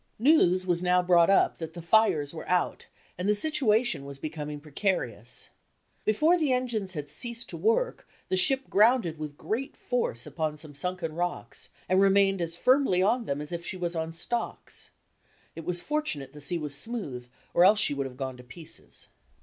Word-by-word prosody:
News 210 Hz, -, +4 dB
was 175 Hz, -2 st, 0 dB
now 180 Hz, 0 st, +3 dB
brought 175 Hz, -1 st, +5 dB
up 195 Hz, -, +3 dB
that 160 Hz, -1 st, -6 dB
the -, -, -6 dB
fires 170 Hz, -7 st, +3 dB
were 160 Hz, -, -8 dB
out, 180 Hz, -1 st, 0 dB, 0.3 s
and 185 Hz, +3 st, 0 dB
the 210 Hz, -, +4 dB
situation 240 Hz, -, +2 dB
was 140 Hz, 0 st, -9 dB
becoming 150 Hz, 0 st, -5 dB
precarious. 145 Hz, -, -3 dB, 0.6 s
Before 310 Hz, +11 st, +3 dB
the 300 Hz, -4 st, +1 dB
engines 230 Hz, -7 st, -1 dB
had 145 Hz, -1 st, -4 dB
ceased 235 Hz, -, -6 dB
to -, -, -6 dB
work 485 Hz, +2 st, 0 dB, 0.2 s
the -, -, 0 dB
ship 265 Hz, +8 st, +4 dB
grounded 210 Hz, -6 st, +3 dB
with 150 Hz, -1 st, -6 dB
great 235 Hz, +9 st, -4 dB
force 235 Hz, -, -1 dB
upon 150 Hz, 0 st, -3 dB
some 150 Hz, -1 st, -6 dB
sunken 175 Hz, +1 st, -3 dB
rocks, 175 Hz, +2 st, -4 dB, 0.2 s
and 185 Hz, +1 st, +3 dB
remained 195 Hz, -1 st, +4 dB
as 170 Hz, 0 st, -2 dB
firmly 255 Hz, -5 st, +3 dB
on 200 Hz, -, +4 dB
SKETCHES -, -, +5 dB
OF -, -, +4 dB
TRAVEL 245 Hz, -2 st, -5 dB
them 145 Hz, -, -5 dB
as 150 Hz, -, -7 dB
if 170 Hz, -1 st, -4 dB
she 185 Hz, -, -2 dB
was 175 Hz, -1 st, -3 dB
on 160 Hz, 0 st, -2 dB
stocks. 235 Hz, +8 st, -5 dB, 0.7 s
It 165 Hz, -, -8 dB
was 175 Hz, 0 st, 0 dB
fortu 300 Hz, -, 0 dB
nate 140 Hz, 0 st, -9 dB
the 150 Hz, -, -11 dB
sea 170 Hz, +4 st, 0 dB
was 150 Hz, -3 st, -5 dB
smooth 145 Hz, -, -4 dB, 0.3 s
or 175 Hz, -, +5 dB
else 205 Hz, +3 st, +6 dB
she 145 Hz, -, +5 dB
would 140 Hz, -1 st, -2 dB
have 125 Hz, -1 st, -12 dB
gone 130 Hz, -2 st, -4 dB
to 125 Hz, -, -12 dB
pieces. 155 Hz, +6 st, -6 dB
180 Hz, 200 wpm, -28 LUFS, 155-220 Hz, 0.7 s, else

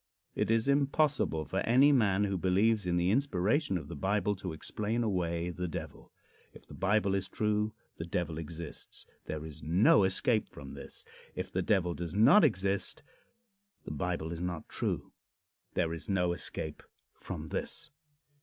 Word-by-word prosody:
It -, -, -1 dB
is 115 Hz, +2 st, +2 dB
impossible 140 Hz, -, +2 dB
for -, -, -2 dB
any 130 Hz, +5 st, +5 dB
man 105 Hz, -7 st, +3 dB
who 100 Hz, -1 st, 0 dB
believes 100 Hz, +3 st, +2 dB
in 90 Hz, 0 st, +1 dB
the 90 Hz, +2 st, +2 dB
inspiration 115 Hz, -, +1 dB
of 85 Hz, -, -7 dB
the -, -, -7 dB
Bible 105 Hz, +1 st, +1 dB
to 95 Hz, -2 st, -5 dB
explain 105 Hz, +8 st, -2 dB
away 90 Hz, -4 st, -1 dB
the 90 Hz, +1 st, -3 dB
Devil. 80 Hz, -, -7 dB, 0.4 s
If -, -, -14 dB
the -, -, -13 dB
Bible 100 Hz, +1 st, +2 dB
is 95 Hz, -1 st, 0 dB
true 105 Hz, 0 st, 0 dB, 0.2 s
the 80 Hz, -, -4 dB
Devil 85 Hz, -2 st, -2 dB
exists. 80 Hz, 0 st, -7 dB, 0.2 s
There 80 Hz, 0 st, -4 dB
is 75 Hz, -1 st, -9 dB
no 90 Hz, +5 st, +5 dB
escape 105 Hz, +4 st, +2 dB
from -, -, -10 dB
this. -, -, -8 dB, 0.3 s
If -, -, -4 dB
the -, -, 0 dB
Devil 95 Hz, -5 st, +2 dB
does 85 Hz, +1 st, -5 dB
not 115 Hz, -, +7 dB
exist 100 Hz, -7 st, 0 dB, 0.8 s
the -, -, -5 dB
Bible 80 Hz, +1 st, -2 dB
is 85 Hz, -, -4 dB
not 90 Hz, -3 st, -3 dB
true. -, -, -2 dB, 0.6 s
There 85 Hz, -2 st, +1 dB
is 80 Hz, +2 st, -7 dB
no 90 Hz, -3 st, +2 dB
escape 80 Hz, -2 st, -5 dB, 0.3 s
from -, -, -7 dB
this. 165 Hz, -2 st, -4 dB
95 Hz, 165 wpm, -31 LUFS, 85-110 Hz, 0.8 s, not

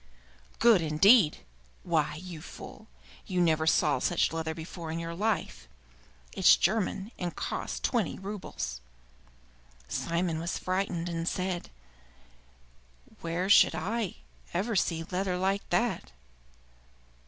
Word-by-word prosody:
"Good, 230 Hz, -6 st, +5 dB
indeed! 165 Hz, +4 st, +5 dB, 0.4 s
Why, 155 Hz, -3 st, 0 dB
you 170 Hz, -1 st, -8 dB
fool, -, -, -11 dB, 0.4 s
you 185 Hz, -1 st, -1 dB
never 160 Hz, -2 st, +2 dB
saw 150 Hz, -2 st, +3 dB
such 175 Hz, -, +1 dB
leather 160 Hz, -1 st, -3 dB
before 165 Hz, 0 st, -7 dB
in 165 Hz, -, -3 dB
your 165 Hz, 0 st, -4 dB
life. 170 Hz, -, -2 dB, 0.7 s
It's -, -, +6 dB
German, 215 Hz, -1 st, 0 dB
and 175 Hz, -2 st, -3 dB
cost -, -, -4 dB
twenty 230 Hz, -8 st, 0 dB
roubles." 190 Hz, -, -5 dB, 1.1 s
Simon 170 Hz, -1 st, -1 dB
was 170 Hz, +2 st, -2 dB
frightened, 185 Hz, -2 st, -2 dB
and 165 Hz, -1 st, -3 dB
said, 180 Hz, -1 st, -2 dB, 1.5 s
"Where 170 Hz, +3 st, -2 dB
should 200 Hz, -, +6 dB
I 200 Hz, +4 st, -2 dB, 0.4 s
ever 210 Hz, +5 st, 0 dB
see 165 Hz, -3 st, 0 dB
leather 185 Hz, 0 st, -1 dB
like 195 Hz, +2 st, -1 dB
that?" 235 Hz, -, 0 dB
175 Hz, 115 wpm, -29 LUFS, 165-195 Hz, 1.5 s, It's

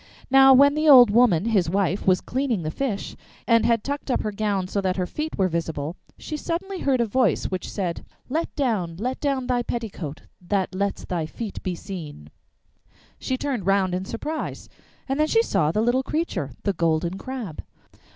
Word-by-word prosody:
Now 270 Hz, 0 st, +8 dB
while 280 Hz, +2 st, +7 dB
the 305 Hz, +1 st, +2 dB
old 250 Hz, -6 st, +9 dB
woman, 215 Hz, -6 st, +4 dB
his 200 Hz, -7 st, +2 dB
wife, 195 Hz, +1 st, 0 dB
was 185 Hz, -1 st, +4 dB
cleaning 255 Hz, -8 st, -1 dB
the 155 Hz, -, -2 dB
fish, 230 Hz, -1 st, -3 dB, 0.3 s
and 230 Hz, -1 st, +4 dB
had 230 Hz, -2 st, +2 dB
tucked 285 Hz, 0 st, -4 dB
up 255 Hz, -, +1 dB
her 215 Hz, -, -2 dB
gown 200 Hz, -3 st, -1 dB
so 200 Hz, +2 st, -1 dB
that 185 Hz, -1 st, -1 dB
her 180 Hz, -, 0 dB
feet 305 Hz, -, -5 dB
were 190 Hz, -, +3 dB
visible, 165 Hz, -2 st, -3 dB, 0.2 s
she 305 Hz, -, -5 dB
suddenly 365 Hz, +5 st, -4 dB
heard 270 Hz, -5 st, +1 dB
a -, -, +2 dB
voice, 230 Hz, -1 st, +1 dB
which 185 Hz, -1 st, -3 dB
said: 180 Hz, -5 st, -3 dB, 0.2 s
'Let 320 Hz, +6 st, -2 dB
down, 210 Hz, -, -1 dB
let 250 Hz, +6 st, -3 dB
down 275 Hz, -3 st, -1 dB
thy 245 Hz, -1 st, +1 dB
petticoat 210 Hz, -11 st, -5 dB, 0.2 s
That 190 Hz, +1 st, -1 dB
lets 200 Hz, +1 st, -2 dB
thy 170 Hz, -3 st, -2 dB
feet 215 Hz, +4 st, -6 dB
be 180 Hz, -1 st, -3 dB
seen.' 150 Hz, -, -8 dB, 0.9 s
She 260 Hz, -, -2 dB
turned 255 Hz, -9 st, -3 dB
round 195 Hz, -2 st, +2 dB
in 185 Hz, +1 st, -2 dB
surprise, 300 Hz, +10 st, -5 dB, 0.4 s
and 270 Hz, +2 st, -1 dB
then 305 Hz, -, +3 dB
she 455 Hz, +7 st, +3 dB
saw 165 Hz, -, +1 dB
the 210 Hz, -, 0 dB
little 245 Hz, +3 st, +2 dB
creature, 300 Hz, -, -2 dB
the 200 Hz, -, +1 dB
Golden 170 Hz, +2 st, 0 dB
Crab. 245 Hz, -, -6 dB
210 Hz, 190 wpm, -24 LUFS, 180-265 Hz, 0.9 s, old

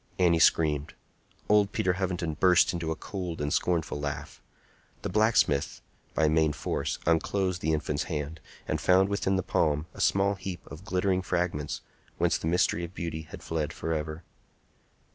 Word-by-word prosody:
Annie 85 Hz, -3 st, +4 dB
screamed. 75 Hz, -3 st, +3 dB, 0.5 s
Old 105 Hz, -1 st, +4 dB
Peter 90 Hz, -, +1 dB
Hovenden 90 Hz, -3 st, -2 dB
burst 90 Hz, +4 st, +4 dB
into 85 Hz, -2 st, -3 dB
a 80 Hz, -, -1 dB
cold 90 Hz, -2 st, -5 dB
and 75 Hz, 0 st, -1 dB
scornful 85 Hz, -4 st, 0 dB
laugh. 75 Hz, 0 st, -5 dB, 0.6 s
The -, -, -2 dB
blacksmith, 105 Hz, -10 st, +2 dB, 0.4 s
by 80 Hz, -, +3 dB
main 80 Hz, -1 st, +3 dB
force, -, -, -2 dB
unclosed 90 Hz, +3 st, +1 dB
the 80 Hz, -, +1 dB
infant's 75 Hz, -1 st, -1 dB
hand, 75 Hz, -1 st, -4 dB, 0.3 s
and -, -, -1 dB
found 95 Hz, +1 st, +4 dB
within 100 Hz, -1 st, 0 dB
the 95 Hz, -, 0 dB
palm 75 Hz, -2 st, +1 dB
a -, -, -7 dB
small 100 Hz, +1 st, +3 dB
heap 95 Hz, -2 st, -6 dB
of 75 Hz, +6 st, -11 dB
glittering 95 Hz, -2 st, +1 dB
fragments, 85 Hz, -5 st, -2 dB, 0.4 s
whence -, -, +2 dB
the -, -, -3 dB
mystery 85 Hz, 0 st, +2 dB
of 85 Hz, +2 st, -7 dB
beauty 80 Hz, -2 st, -4 dB
had -, -, -9 dB
fled 80 Hz, -1 st, -2 dB
forever. 80 Hz, 0 st, -3 dB
85 Hz, 160 wpm, -28 LUFS, 75-95 Hz, 0.6 s, Annie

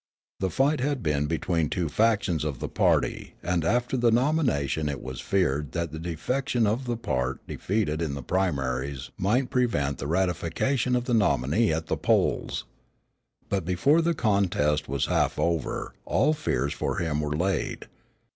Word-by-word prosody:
The 95 Hz, -, 0 dB
fight 140 Hz, -, +2 dB
had 135 Hz, -2 st, -1 dB
been 75 Hz, -1 st, +1 dB
between 80 Hz, 0 st, 0 dB
two 90 Hz, -3 st, -1 dB
factions 100 Hz, -3 st, +1 dB
of 75 Hz, -4 st, -2 dB
the -, -, -4 dB
party -, -, +1 dB
and 90 Hz, -1 st, 0 dB
after 120 Hz, +8 st, +1 dB
the 120 Hz, -2 st, +3 dB
nomination 115 Hz, -, +1 dB
it 70 Hz, -3 st, -3 dB
was 65 Hz, +2 st, -6 dB
feared 75 Hz, -8 st, 0 dB
that 85 Hz, -2 st, -2 dB
the 80 Hz, -, -6 dB
defection 120 Hz, -, -1 dB
of 115 Hz, +5 st, 0 dB
the 120 Hz, -1 st, -2 dB
part 65 Hz, -, -2 dB
defeated 90 Hz, -6 st, -1 dB
in 75 Hz, -4 st, -2 dB
the 70 Hz, -, -6 dB
primaries 70 Hz, -7 st, -1 dB
might 125 Hz, +8 st, +1 dB
prevent 115 Hz, -, +1 dB
the 70 Hz, -, -3 dB
ratification 95 Hz, -, 0 dB
of 125 Hz, 0 st, 0 dB
the 125 Hz, -, -1 dB
nominee 105 Hz, -, +2 dB
at 80 Hz, +1 st, -1 dB
the -, -, -1 dB
polls. -, -, +1 dB, 0.8 s
But 100 Hz, -2 st, -1 dB
before 115 Hz, -, +3 dB
the 170 Hz, 0 st, +1 dB
contest 90 Hz, -, +1 dB
was 70 Hz, -1 st, 0 dB
half -, -, +1 dB
over 85 Hz, -3 st, -1 dB
all 155 Hz, -, +2 dB
fears 155 Hz, -, -1 dB
for -, -, -2 dB
him 75 Hz, -3 st, 0 dB
were 75 Hz, 0 st, -2 dB
laid. 90 Hz, -1 st, -1 dB
90 Hz, 165 wpm, -26 LUFS, 75-120 Hz, 0.8 s, the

